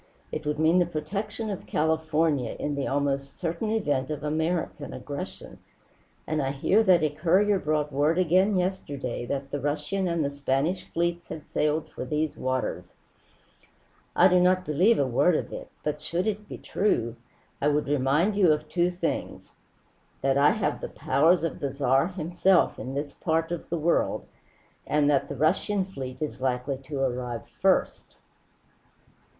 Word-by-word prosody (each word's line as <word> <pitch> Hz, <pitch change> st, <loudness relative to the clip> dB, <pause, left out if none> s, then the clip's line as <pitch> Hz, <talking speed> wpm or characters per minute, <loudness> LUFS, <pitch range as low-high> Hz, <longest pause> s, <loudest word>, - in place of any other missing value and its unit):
It 155 Hz, -1 st, -4 dB
would 150 Hz, 0 st, 0 dB
mean 160 Hz, +3 st, +4 dB
the 175 Hz, -, +2 dB
protection 200 Hz, +7 st, -4 dB
of 195 Hz, -, -6 dB
California 160 Hz, -4 st, +1 dB
in 145 Hz, -, -2 dB
the 140 Hz, -1 st, -2 dB
almost 140 Hz, 0 st, -1 dB
certain 170 Hz, +5 st, -2 dB
event 145 Hz, -12 st, 0 dB
of 150 Hz, -1 st, -4 dB
'American' 160 Hz, +3 st, -2 dB
aggression. -, -, -7 dB, 0.7 s
And 155 Hz, -1 st, -1 dB
I 135 Hz, -, 0 dB
hear 145 Hz, +10 st, +2 dB
that 185 Hz, -7 st, +4 dB
a 155 Hz, -, +2 dB
courier 185 Hz, +6 st, +3 dB
brought 150 Hz, -2 st, 0 dB
word 150 Hz, +4 st, +2 dB
again 185 Hz, +3 st, +3 dB
yesterday 145 Hz, -10 st, -3 dB
that 135 Hz, +1 st, -3 dB
the 145 Hz, -, -2 dB
Russian 150 Hz, +7 st, -1 dB
and 170 Hz, -3 st, 0 dB
the 140 Hz, -, -1 dB
Spanish 140 Hz, +5 st, -1 dB
fleets 170 Hz, 0 st, -1 dB
had 155 Hz, -, -7 dB
sailed 150 Hz, +1 st, 0 dB
for -, -, -6 dB
these 150 Hz, +3 st, -1 dB
waters. 130 Hz, -9 st, -3 dB, 1.2 s
I 180 Hz, -, +7 dB
do 180 Hz, -1 st, +4 dB
not 185 Hz, +1 st, +3 dB
believe 180 Hz, +10 st, +3 dB
a 140 Hz, -, +2 dB
word 140 Hz, +7 st, +3 dB
of -, -, -3 dB
it; -, -, -7 dB
but 150 Hz, 0 st, -2 dB
should 170 Hz, +4 st, -1 dB
it 210 Hz, -1 st, -3 dB
be -, -, -6 dB
true, 120 Hz, -, 0 dB, 0.5 s
I 145 Hz, -, +2 dB
would 150 Hz, 0 st, +1 dB
remind 145 Hz, +8 st, +2 dB
you 190 Hz, -5 st, +5 dB
of 150 Hz, 0 st, 0 dB
two 175 Hz, +2 st, +1 dB
things: 180 Hz, 0 st, -4 dB, 0.7 s
that 135 Hz, 0 st, +3 dB
I 140 Hz, +1 st, +5 dB
have -, -, -1 dB
the -, -, -4 dB
powers 160 Hz, +6 st, +2 dB
of 165 Hz, -, -2 dB
the 140 Hz, -2 st, -2 dB
Tsar 135 Hz, +1 st, +2 dB
himself 180 Hz, 0 st, +2 dB
in 130 Hz, +1 st, -5 dB
this 145 Hz, 0 st, -3 dB
part 165 Hz, 0 st, -1 dB
of 175 Hz, -, -5 dB
the 170 Hz, -, -1 dB
world, 165 Hz, +2 st, +1 dB, 0.6 s
and 150 Hz, -1 st, +2 dB
that 140 Hz, -, +1 dB
the 145 Hz, -, -4 dB
Russian 185 Hz, +7 st, +1 dB
fleet 130 Hz, -9 st, -7 dB
is 150 Hz, -4 st, -4 dB
likely 130 Hz, +1 st, -1 dB
to 140 Hz, -1 st, -4 dB
arrive 125 Hz, -3 st, -2 dB, 0.2 s
first." -, -, +1 dB
155 Hz, 165 wpm, -27 LUFS, 140-180 Hz, 1.2 s, I